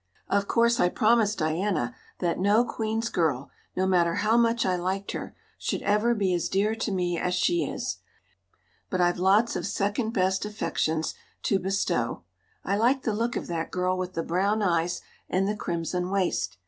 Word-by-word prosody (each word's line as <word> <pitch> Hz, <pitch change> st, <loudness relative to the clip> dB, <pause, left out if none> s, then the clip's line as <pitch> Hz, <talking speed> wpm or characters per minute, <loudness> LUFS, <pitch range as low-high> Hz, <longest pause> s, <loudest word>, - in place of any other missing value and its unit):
Of 200 Hz, 0 st, +1 dB
course 235 Hz, 0 st, +3 dB
I 180 Hz, -, +4 dB
promised 220 Hz, 0 st, +3 dB
Diana 160 Hz, -, 0 dB, 0.2 s
that 175 Hz, -1 st, -1 dB
no 205 Hz, +5 st, +4 dB
Queen's 225 Hz, 0 st, -2 dB
girl, 150 Hz, -, 0 dB, 0.2 s
no 185 Hz, -, +1 dB
matter 175 Hz, -3 st, +3 dB
how 220 Hz, +2 st, +2 dB
much 235 Hz, 0 st, +3 dB
I 185 Hz, -, +2 dB
liked 190 Hz, +3 st, -2 dB
her, -, -, -6 dB, 0.2 s
should -, -, -2 dB
ever 210 Hz, +4 st, +2 dB
be 195 Hz, -4 st, +1 dB
as 175 Hz, -, 0 dB
dear 205 Hz, +3 st, +1 dB
to 225 Hz, -1 st, -2 dB
me 180 Hz, -2 st, 0 dB
as 180 Hz, 0 st, 0 dB
she 345 Hz, -, +2 dB
is; -, -, -3 dB, 0.9 s
but 185 Hz, -, -1 dB
I've 175 Hz, 0 st, +2 dB
lots 200 Hz, +5 st, +3 dB
of -, -, -2 dB
second 205 Hz, +3 st, -1 dB
best 190 Hz, -3 st, +1 dB
affections 160 Hz, -6 st, -1 dB, 0.3 s
to 195 Hz, -, +2 dB
bestow. 180 Hz, -, -1 dB, 0.4 s
I 200 Hz, +2 st, +1 dB
like 255 Hz, +5 st, +2 dB
the 220 Hz, -, 0 dB
look 230 Hz, +3 st, -1 dB
of -, -, -3 dB
that 165 Hz, -1 st, -3 dB
girl 185 Hz, 0 st, 0 dB
with 185 Hz, 0 st, -4 dB
the 165 Hz, -, -2 dB
brown 200 Hz, +6 st, +1 dB
eyes 175 Hz, -2 st, +1 dB, 0.3 s
and 190 Hz, +2 st, +1 dB
the 210 Hz, -, 0 dB
crimson 180 Hz, -1 st, -2 dB
waist. 185 Hz, -, 0 dB
190 Hz, 180 wpm, -27 LUFS, 175-215 Hz, 0.9 s, I